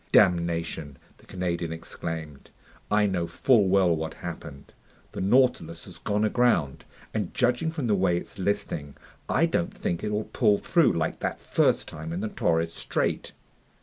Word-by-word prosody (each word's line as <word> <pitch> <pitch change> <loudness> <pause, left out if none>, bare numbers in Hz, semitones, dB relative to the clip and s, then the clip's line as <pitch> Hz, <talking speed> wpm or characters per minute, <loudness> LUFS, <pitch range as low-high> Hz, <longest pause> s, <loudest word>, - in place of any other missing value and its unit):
"Damnation!" 85 -6 +2 0.2
the - - -21
Canadian 85 -2 -2
exclaimed. 80 -2 -6 0.4
"I 105 0 +3
know 90 -4 0
full 115 -2 +3
well 95 -3 +4
what 80 0 -4
happened! 70 0 -8 0.4
The - - -5
Nautilus 100 -7 +2
has - - -11
gone 105 +1 0
aground, 110 - +1 0.3
and 105 -5 -3
judging 125 +6 +2
from 160 -5 -3
the 110 - +2
way 90 -3 +2
it's 90 - -7
listing, 80 -7 -2 0.3
I 165 - +3
don't 175 +2 0
think 85 - -3
it'll 105 0 -1
pull 105 -1 +2
through 170 +7 +3
like 85 -1 -1
that - - -2
first - - +1
time 80 +1 -7
in 90 - -3
the 110 - -2
Torres 80 -3 0
Strait." - - -2
90 Hz, 155 wpm, -27 LUFS, 80-110 Hz, 0.4 s, well